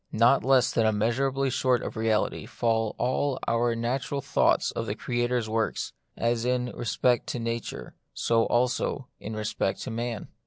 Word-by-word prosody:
Not 120 +5 +4
less 130 -1 +4
than 115 -1 +2
immeasurably 130 +5 +1
short 125 -1 +2
of - - -4
the - - -6
reality 110 -1 0
fall 115 -2 0
all 130 +2 0
our 115 0 +2
natural 125 +4 -2
thoughts - - +2
of - - -4
the - - -2
Creator's 120 -1 -1
works; 110 +1 -1 0.2
as 115 0 0
in 125 0 0
respect 120 +2 +1
to 125 - -3
nature, 115 0 -4 0.2
so 115 -1 +2
also 125 +2 0
in 110 +1 -6
respect 105 -2 -1
to 130 - -5
man. 115 -1 -4
120 Hz, 160 wpm, -27 LUFS, 115-125 Hz, 0.2 s, Not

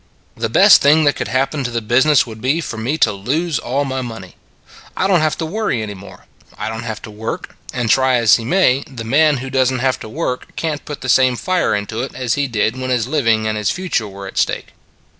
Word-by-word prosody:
" - - -38
The - - -1
best - - +7
thing 150 +3 +5
that 145 -1 +3
could - - -3
happen 135 +2 -1
to 125 - -2
the 120 -1 -2
business 130 +6 +3
would 110 -2 -10
be 135 +6 +1
for 135 -9 -5
me 125 +8 -2
to 140 -8 +3
lose 140 - -2
all 135 +4 -1
my 130 -1 -3
money. 110 -7 -8 0.6
I - - +1
don 190 -2 +4
t - - +1
have 155 -1 0
to 165 - -3
worry 170 - -2
any 105 -1 -5
more; 100 0 -13 0.3
I - - -3
don 110 0 -5
t 115 - -7
have 110 -1 -5
to 110 - -9
work 110 +2 -6 0.2
and 120 -1 -2
try 130 +2 +3
as 115 -4 +5
he 115 - -6
may, 140 -2 +2
the 125 -4 -7
man 145 +5 +3
who 135 - -7
does 130 -1 +2
n 130 - -2
t - - -4
have 130 -1 +1
to 110 - -9
work 125 -1 -4
can 155 -3 -2
t - - -30
put 145 - -7
the 130 - -5
same 130 0 +4
fire 185 - 0
into 105 +3 -3
it 130 - -6
as 125 -3 -1
he 145 -1 0
did 115 +1 -1
when 130 0 -4
his 125 -3 +1
living 115 -7 +1
and 110 0 -1
his 105 - 0
future 180 - -2
were 100 0 -9
at 95 - -4
stake." - - -1
130 Hz, 265 wpm, -18 LUFS, 110-145 Hz, 0.6 s, best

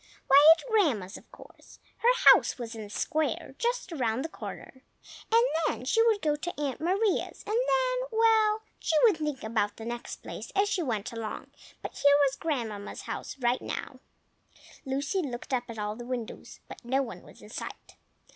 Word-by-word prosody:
Why, 280 +1 +7
at - - -11
Grandma's, 285 - +1
of - - -13
course! - - -16 0.2
her - - +6
house - - 0
was 235 -2 -6
in 225 - -7
the 210 - -8
square, 310 +8 -2
just 480 -4 -1
round 255 -3 -1
the - - -4
corner. 260 -4 -9 0.5
And 460 +2 +5 0.2
then 255 - -3
she 450 - +3
would 430 -3 +2
go 300 -1 +2
to 325 +2 -6
Aunt 285 -2 -3
Maria's, 385 +4 0
and 425 - -3
then,—well, 470 -3 +2 0.2
she 320 - -1
would 430 -8 +5
think 300 -4 -3
about 220 -2 -1
the 225 - -8
next 240 0 -6
place - - -8
as 400 +1 +3
she 395 -3 0
went 225 -9 -2
along, 225 -2 -6 0.3
but - - -5
here 285 0 +5
was 270 0 0
Grandmamma's 230 -11 -4
house - - -6
now. 245 0 -2 0.9
Lucy 280 +7 -1
looked 255 -3 -5
up 245 -1 0
at 230 - -7
all 210 0 -3
the 240 - -8
windows, 240 -2 -6
but - - -11
no 265 +3 +1
one 235 - -8
was - - -16
in - - -12
sight. - - -8
285 Hz, 180 wpm, -28 LUFS, -, 0.9 s, Why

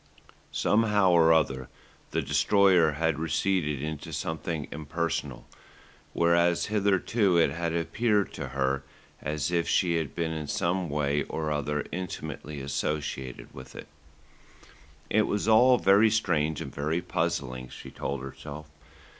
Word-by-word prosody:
Somehow 105 -3 +3
or 85 -1 +5
other 65 -5 +1 0.4
the - - -1
Destroyer 85 +2 +4
had 80 0 0
receded 80 -2 0
into 80 +1 -5
something 80 -1 -3
impersonal, 75 -3 -3 0.7
whereas 85 0 +3
hitherto 100 -1 +2
it 80 -4 +4
had 85 +1 -2
appeared 105 +4 0
to - - -5
her 70 +1 -1 0.4
as 75 +2 -2
if 85 -1 +1
she 85 -2 +2
had 80 -4 -4
been 85 -1 -1
in 80 -2 -4
some 90 +1 -1
way 75 0 0
or 80 -1 -3
other 75 0 -1
intimately 80 -4 -6
associated 70 -2 -4
with 65 0 -11
it. - - -9 1.2
It 110 -1 +3
was 105 +1 -1
all 125 +3 +6
very 100 +2 +5
strange 80 -8 0
and - - -7
very 80 +4 -1
puzzling, 75 -8 -2
she - - -10
told 70 -1 -4
herself. 75 +2 -9
80 Hz, 130 wpm, -28 LUFS, 75-90 Hz, 1.2 s, all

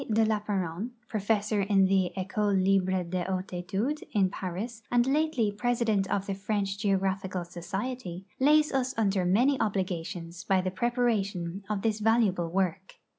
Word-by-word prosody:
de 220 +1 +4
Lapparent, 205 -2 -1 0.2
ju 215 - 0
ofessor 210 0 +1
in 195 -2 +5
tlie 190 -2 +2
Ecole 200 +2 0
libre 190 -1 +2
de 175 +1 -2
hcmtes 185 +1 -3
etudes 195 +12 -2
in 195 -4 +3
Paris 200 +6 -5
and 240 0 +3
lately 270 -6 +1
jnesident 220 -2 +1
of 195 0 -1
the 200 - -2
French 200 0 -2
Geographical 190 -2 0
Society, 185 +2 -5
lays 300 +2 +4
us 260 -1 0
under 195 -4 +1
many 245 +10 +3
oldigations 180 -4 -3
by 190 -1 +2
the 185 0 -1
iireparation 205 -6 -1
of 205 -2 -2
this 220 -1 +1
valuable 210 -6 +2
work. 185 +1 -1
195 Hz, 150 wpm, -28 LUFS, 185-225 Hz, 0.2 s, in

